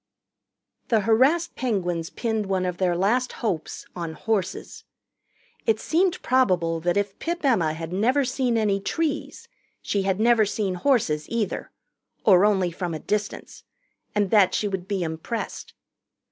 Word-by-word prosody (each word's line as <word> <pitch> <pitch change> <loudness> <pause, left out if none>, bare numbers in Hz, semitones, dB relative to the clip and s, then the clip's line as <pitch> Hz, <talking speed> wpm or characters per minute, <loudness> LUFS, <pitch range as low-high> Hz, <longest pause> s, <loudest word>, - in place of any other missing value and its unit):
The 225 -3 +3
harassed 260 - +3
Penguins 180 -9 -1
pinned 220 -3 -2
one 190 -1 0
of 180 -1 -2
their 180 -2 +1
last 240 +7 +1
hopes 195 -9 -3
on 170 -2 -4
horses. 195 +2 -3 0.8
It 220 -1 +3
seemed 355 +3 +1
probable 180 -10 +2
that 175 +3 0
if 205 -1 -2
Pip 340 -1 -3
Emma 175 - +3
had 165 +2 -6
never 255 +8 +2
seen 250 -2 0
any 205 -3 +1
trees, 305 +8 -3 0.3
she 200 - -1
had 190 0 0
never 230 0 +5
seen 205 -2 -1
horses, 180 - +1
either 225 -4 -2 0.6
or 195 -2 +6
only 190 -4 +2
from 170 -1 -4
a - - -5
distance 210 +3 -4 0.5
and 205 -2 +1
that 205 -4 +5
she 210 - 0
would 190 -2 -4
be 195 -3 -1
impressed. 165 +8 -5
205 Hz, 145 wpm, -24 LUFS, 180-235 Hz, 0.8 s, or